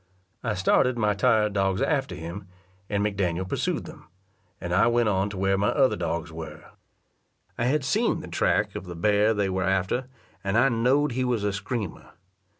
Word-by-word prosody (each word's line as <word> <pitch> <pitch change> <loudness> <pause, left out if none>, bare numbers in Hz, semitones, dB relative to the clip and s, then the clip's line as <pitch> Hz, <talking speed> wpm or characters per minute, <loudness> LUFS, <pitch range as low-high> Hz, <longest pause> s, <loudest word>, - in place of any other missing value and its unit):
I - - -1
started 120 +7 +2
my 105 -2 +2
tired 105 -1 +2
dogs 95 -1 +1
after 135 - 0
him, 90 +3 -7 0.4
and 100 0 0
McDaniel 95 -3 -1
pursued - - -2
them, - - -12 0.5
and 85 0 -4
I 100 +5 +4
went 120 -1 +2
on 95 0 +1
to 100 - -7
where 95 0 +1
my 100 - +2
other 135 -3 +3
dogs 85 0 -3
were. 80 -1 -9 0.8
I 120 - -1
had 140 +2 +1
seen 220 +11 +1
the - - -9
track 85 - +1
of 90 - -5
the 90 -1 -7
bear 105 +5 +2
they 100 -1 +1
were 95 0 -1
after, 95 +7 0 0.4
and 100 +2 0
I 130 +3 +5
knowed 130 +5 +2
he 130 +2 -1
was 120 -4 0
a 105 -1 0
screamer. 100 0 -5
100 Hz, 185 wpm, -26 LUFS, 95-120 Hz, 0.8 s, I